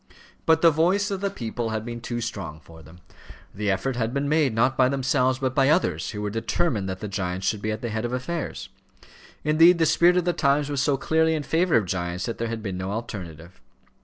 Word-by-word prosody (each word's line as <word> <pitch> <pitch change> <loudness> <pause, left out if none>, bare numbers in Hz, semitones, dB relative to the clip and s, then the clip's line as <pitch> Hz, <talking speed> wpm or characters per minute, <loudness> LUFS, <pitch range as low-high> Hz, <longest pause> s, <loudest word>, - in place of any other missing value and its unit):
But 160 0 +4
the 165 - +8
voice 185 +6 +1
of 195 -1 -3
the 200 - 0
people 120 - -4
had 110 0 -3
been 120 0 -6
too 120 0 -4
strong 95 -8 -5
for 80 0 -15
them; 80 +3 -16 0.5
the 105 +1 -2
effort 100 +7 -1
had 115 +2 -1
been 140 +1 0
made, 150 -3 +2
not 130 +4 +2
by 130 -1 +4
themselves, 130 -1 +1
but 130 -1 -1
by 135 0 +3
others, 90 - +1
who 105 -2 -5
were 105 - -2
determined 115 - -1
that 95 0 -5
the 105 - -4
giants 95 -1 -3
should 105 -2 0
be 110 - -2
at 110 - -4
the 120 - -2
head 110 +1 -2
of 120 - -2
affairs. 140 +7 -4 0.7
Indeed, 165 +3 +5
the 165 - +3
spirit 175 +3 +4
of 180 - +1
the 175 - +1
times 145 -2 +1
was 140 -2 0
so 140 -1 +2
clearly 160 +3 +2
in 150 - -3
favour 170 0 +2
of 110 - +1
giants 90 0 -3
that 115 - -5
there 115 - -1
had 115 -1 -5
been 95 -3 -4
no 95 +1 -3
alternative. 90 -6 -7
120 Hz, 235 wpm, -25 LUFS, 100-150 Hz, 0.7 s, the